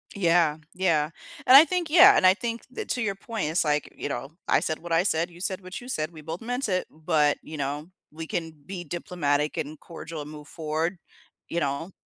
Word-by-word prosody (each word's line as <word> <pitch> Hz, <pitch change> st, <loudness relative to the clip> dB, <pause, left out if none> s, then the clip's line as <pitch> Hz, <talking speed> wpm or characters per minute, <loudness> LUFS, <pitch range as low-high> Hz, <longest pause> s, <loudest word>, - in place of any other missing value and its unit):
Yeah. 170 Hz, -5 st, +3 dB, 0.2 s
Yeah. 165 Hz, -5 st, +1 dB, 0.3 s
And 255 Hz, -, +8 dB
I 290 Hz, +4 st, +11 dB
think 345 Hz, 0 st, -1 dB
yeah, 365 Hz, +6 st, +8 dB
and -, -, +3 dB
I 185 Hz, -, +8 dB
think 230 Hz, +3 st, -4 dB
that -, -, -6 dB
to 250 Hz, -, -1 dB
your 205 Hz, -3 st, 0 dB
point, 205 Hz, -4 st, -4 dB
it's 165 Hz, -, +2 dB
like, 150 Hz, -1 st, 0 dB
you -, -, -4 dB
know, 135 Hz, +1 st, -4 dB, 0.2 s
"I -, -, +4 dB
said 155 Hz, -, -2 dB
what 175 Hz, +1 st, -9 dB
I 165 Hz, +1 st, +4 dB
said, 170 Hz, -2 st, +1 dB
you 175 Hz, 0 st, -15 dB
said 190 Hz, 0 st, -2 dB
what 185 Hz, 0 st, -7 dB
you 245 Hz, -, -11 dB
said. 155 Hz, -10 st, -2 dB
We 160 Hz, -2 st, -11 dB
both 160 Hz, +3 st, -6 dB
meant 245 Hz, +3 st, -2 dB
it, 185 Hz, -2 st, 0 dB
but," 155 Hz, -2 st, +1 dB
you 155 Hz, -, -8 dB
know, 145 Hz, +3 st, -3 dB, 0.2 s
"we 160 Hz, +2 st, -7 dB
can 165 Hz, 0 st, -3 dB
be 185 Hz, -2 st, -6 dB
diplomatic 150 Hz, -3 st, -1 dB
and 150 Hz, +1 st, -4 dB
cordial 165 Hz, -2 st, -8 dB
and 150 Hz, +1 st, -8 dB
move 150 Hz, -1 st, -10 dB
forward," 160 Hz, +3 st, -2 dB, 0.5 s
you 170 Hz, -, -1 dB
know? 145 Hz, +4 st, -2 dB
170 Hz, 225 wpm, -26 LUFS, 155-195 Hz, 0.5 s, I